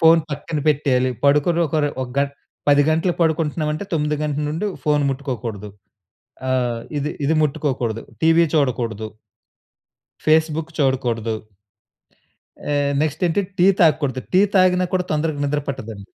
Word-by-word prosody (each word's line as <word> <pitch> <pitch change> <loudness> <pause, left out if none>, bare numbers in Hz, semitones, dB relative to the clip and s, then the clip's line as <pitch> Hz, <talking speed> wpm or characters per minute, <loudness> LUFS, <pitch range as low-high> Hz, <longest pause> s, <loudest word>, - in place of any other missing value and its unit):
Phone 165 0 +6
పక్కన 145 +2 -4
పెట్టేయాలి. 130 -4 +2
పడుకుని 150 +4 +3
ఒక 155 - -6 0.3
ఒక - - -4
గం 140 0 +2 0.4
10 145 0 +6
గంటలకి 165 +3 +1
పడుకుంటున్నాం 160 -1 0
అంటే 155 +6 -4
9 150 -2 0
గంటల 150 0 -1
నుండి 165 +7 -2 0.2
ఫోన్ 150 -1 +2
ముట్టుకోకూడదు. 120 -6 -5 0.8
ఆహ్. 125 -3 0 0.2
ఇది 150 +2 -2
ఇది 160 +3 +2
ముట్టుకోకూడదు. 130 -6 -1 0.2
టీవీ 165 +1 +5
చూడకూడదు. 120 -6 0 1.2
ఫేస్‌బుక్ 160 +1 +2
చూడకూడదు. 120 -6 0 1.4
ఆహ్. 140 0 +1
నెక్స్ట్ 155 +3 -1
ఏంటి? 170 +4 +1 0.2
టీ 180 - +6 0.2
తాగకూడదు. 145 -6 +2
టీ 190 - +7
తాగినా 185 -1 +4
కూడా 180 - +1
తొందరగా 155 -1 -1
నిద్ర 145 +1 -1
పట్టదండి. 110 -7 -6
150 Hz, 130 wpm, -21 LUFS, 130-160 Hz, 1.4 s, టీ